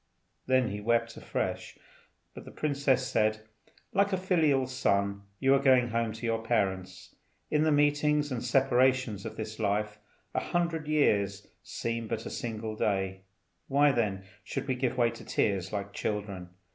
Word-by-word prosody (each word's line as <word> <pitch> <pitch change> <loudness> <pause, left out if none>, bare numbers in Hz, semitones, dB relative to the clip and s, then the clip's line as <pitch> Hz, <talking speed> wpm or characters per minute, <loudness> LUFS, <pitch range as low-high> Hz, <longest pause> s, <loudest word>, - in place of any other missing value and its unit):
Then 130 -2 +3
he 105 +1 -5
wept 115 +1 +1
afresh, - - -4 0.6
but - - -10
the - - -11
princess 140 -3 +1
said, 110 -2 +1 0.5
"Like 200 +1 +3
a 190 - +1
filial 160 -8 +2
son 100 -6 0 0.2
you 135 0 +4
are 140 - +5
going 130 -3 +4
home 115 -1 0
to 115 +2 -7
your 115 -1 0
parents. 95 -5 -2 0.4
In 150 - +3
the 155 - +3
meetings 145 0 +2
and 125 -2 -3
separations 130 -4 +2
of - - -9
this 110 0 -6
life, 105 0 -1 0.3
a - - +1
hundred 170 -3 -1
years 100 -10 +2 0.2
seem 115 -1 -4
but 110 +1 -3
a - - -5
single 110 -2 -4
day; 95 -2 -1 0.4
why, 145 +1 +4
then, 105 -6 -1 0.2
should - - -4
we 130 - +1
give 125 0 -1
way 120 -2 +3
to 115 - -11
tears 95 -3 0
like 100 -1 -4
children? 100 -5 -4
115 Hz, 160 wpm, -29 LUFS, 105-135 Hz, 0.6 s, are